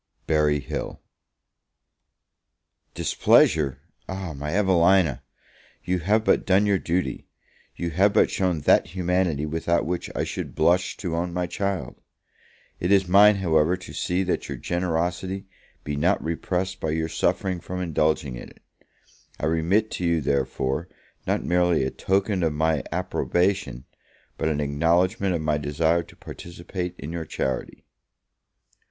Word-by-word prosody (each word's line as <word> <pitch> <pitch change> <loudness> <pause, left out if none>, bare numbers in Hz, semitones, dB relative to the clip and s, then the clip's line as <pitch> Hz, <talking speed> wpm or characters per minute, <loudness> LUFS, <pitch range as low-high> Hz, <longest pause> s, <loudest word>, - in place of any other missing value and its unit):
Berry 75 -2 +2
Hill. - - -5 2.0
DISPLEASURE? 75 -4 +3 0.3
my 80 -6 -5
Evelina! 90 -7 +3 0.6
you 90 0 0
have 105 +6 +1
but - - +3
done 95 +2 +3
your 100 -2 +2
duty; 90 +2 -2 0.5
you 85 -1 -3
have 95 +5 +3
but - - +3
shown 90 -5 0
that 90 - +3
humanity 90 -4 0
without 80 +2 0
which 90 +2 -3
I - - 0
should - - -5
blush 90 +3 +2
to 85 -4 -3
own 85 +1 -2
my 90 0 -1
child. 100 +1 -3 0.8
It 90 - -1
is 95 -2 +4
mine, 100 +3 +7
however, 85 -2 +2
to 90 - -11
see 90 +2 -1
that 90 - -2
your - - -4
generosity 90 +2 -2 0.4
be 75 - -3
not 85 +7 +1
repressed 90 +3 -2
by 80 - -2
your 80 +1 -1
suffering 90 +3 -1
from 90 +2 -6
indulging 80 -6 0
it; - - -11 0.8
I - - -2
remit 85 +7 +1
to - - -4
you, 85 -1 +2
therefore, 70 +2 -1 0.4
not - - 0
merely 90 -4 +2
a 65 - -1
token 95 0 0
of 80 -3 +1
my 80 -1 +1
approbation, 90 -9 -1 0.5
but 80 - -1
an 75 -1 -1
acknowledgment 85 +7 +1
of 80 - -2
my 75 -1 0
desire 80 +3 +1
to - - -15
participate 90 +1 -7
in 75 +4 -7
your 85 -1 -4
charity. 65 -4 -4
85 Hz, 140 wpm, -24 LUFS, 80-95 Hz, 2.0 s, mine